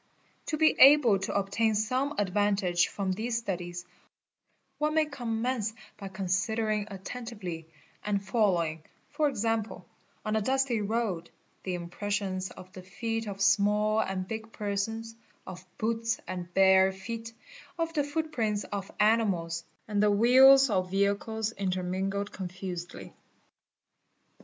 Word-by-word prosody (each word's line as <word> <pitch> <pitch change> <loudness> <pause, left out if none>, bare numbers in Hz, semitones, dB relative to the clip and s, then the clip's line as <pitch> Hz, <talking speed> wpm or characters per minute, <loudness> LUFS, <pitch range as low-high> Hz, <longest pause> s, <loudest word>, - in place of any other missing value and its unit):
To 305 - -1
be 315 0 +5
able 265 -7 +7
jo 190 - -3
obtain 205 +3 +1
some 255 +7 0
advantage 195 -2 +1
from 195 -2 -3
these 225 +5 -2
studies, 175 -5 -4 0.9
one 305 +1 0
may 315 -1 +4
commence 235 -4 -2 0.2
by 195 -2 -7
jonsidering 210 +3 -1
attentively, 195 -5 -7 0.4
and 205 -1 0
following, 190 -6 0 0.3
for 295 0 +1
example 225 -3 -2 0.4
on 215 0 0
a 220 - +2
dusty 260 -1 +1
road, 205 -5 -2 0.3
the 185 -1 -3
impressions 190 +2 -3
of 185 0 -13
the 185 - -9
feet 225 +4 -4
of 200 -1 -3
small 210 +2 +3
and 190 -3 -2
big 220 +1 -6
persons, 220 +2 -3 0.3
of 185 0 -9
boots 230 +1 -1
and 180 -1 -5
bare 190 0 +6
feet, 225 +4 -7 0.5
of 330 -1 -2
the 295 -3 +1
footprints 285 -9 -2
of 200 -2 -5
animals, 195 -7 +2 0.2
and 205 -1 0
the 210 - +4
wheels 260 +5 +7
of 185 -2 0
vehicles 200 +3 0
intermingled 190 0 -2
confusedly. 180 -1 -7
205 Hz, 125 wpm, -29 LUFS, 190-230 Hz, 0.9 s, able